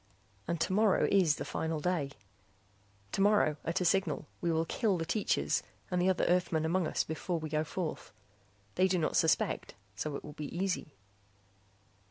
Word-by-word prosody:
And 170 0 -1
tomorrow 200 +3 +3
is 180 -7 +4
the - - -5
final 160 -1 -2
day. 155 -3 0 1.0
Tomorrow, 200 -6 +3
at 165 +3 -1
a - - +1
signal, 175 -4 +1 0.2
we 170 - +1
will 165 0 +1
kill 205 +2 +1
the 165 - -2
teachers 210 +5 +1 0.3
and 180 0 +1
the 185 - +3
other 185 - +2
Earthmen 175 -3 +2
among 170 +1 +1
us - - 0
before 170 +2 -3
we 155 -1 -5
go 155 0 +1
forth. 165 +1 -4 0.6
They 185 +1 +3
do 185 -1 +1
not 160 - 0
suspect, 160 -1 +1 0.2
so 145 +8 -3
it - - -6
will 150 - -9
be 150 - -6
easy. 180 -5 -2
170 Hz, 170 wpm, -32 LUFS, 155-185 Hz, 1.0 s, is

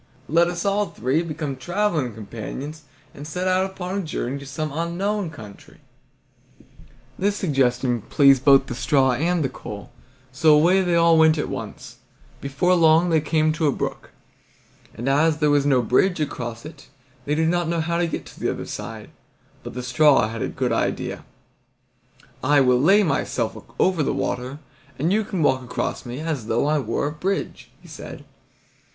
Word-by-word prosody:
Let 170 +3 +3
us 175 +1 -4
all 200 +1 +1
three 130 +8 -1
become 155 -4 -4
traveling 170 - -1
companions 130 +8 -7 0.3
and 145 +1 -9
set 180 +4 -3
out 185 +1 +2
upon 190 0 -5
a - - -1
journey 140 -5 -4
to 140 - -10
some 150 +2 -4
unknown 175 +4 -2
country." 110 -10 -13 1.4
This 200 +1 +1
suggestion 125 - 0
pleased 135 +2 +4
both 135 -1 +6
the - - -6
straw 130 +2 +2
and 165 +6 0
the - - +1
coal, 105 -5 -9 0.4
so 155 +3 +4
away 175 +6 +4
they 175 -2 +1
all 170 -1 +5
went 160 0 +5
at 150 - -2
once. - - -7 0.4
Before 140 +7 +1
long 165 0 +4
they 160 -1 +3
came 155 0 +1
to 160 -1 0
a - - +3
brook, - - -5 0.9
and 120 +4 -5
as 150 +3 +3
there 150 -1 +2
was 145 -1 +2
no 130 -3 +3
bridge 175 - +2
across 120 -5 -4
it 155 -2 -12 0.4
they 150 - 0
did 160 +1 +1
not 175 -1 0
know 170 0 -1
how 170 +1 -1
to 175 - +1
get - - -5
to - - -14
the - - -1
other - - -4
side; - - -7 0.5
but - - -9
the 125 - -4
straw 135 0 +4
had 115 -1 -6
a - - -1
good - - -2
idea: - - -2 1.2
"I 145 +2 +4
will 125 -2 +3
lay 195 +8 +5
myself 170 - -1 0.2
over 185 -4 +2
the 145 - 0
water, 125 +3 -3 0.4
and 160 +7 +1
you 220 +1 +2
can 190 -5 -2
walk 130 -2 +2
across 125 0 -4
me 125 +4 -6
as 155 -9 -3
though 115 +5 +1
I 150 +1 +2
were 140 - -2
a 145 - -1
bridge," 190 +6 -3
he - - -14
said. - - -10
155 Hz, 180 wpm, -23 LUFS, 130-170 Hz, 1.4 s, both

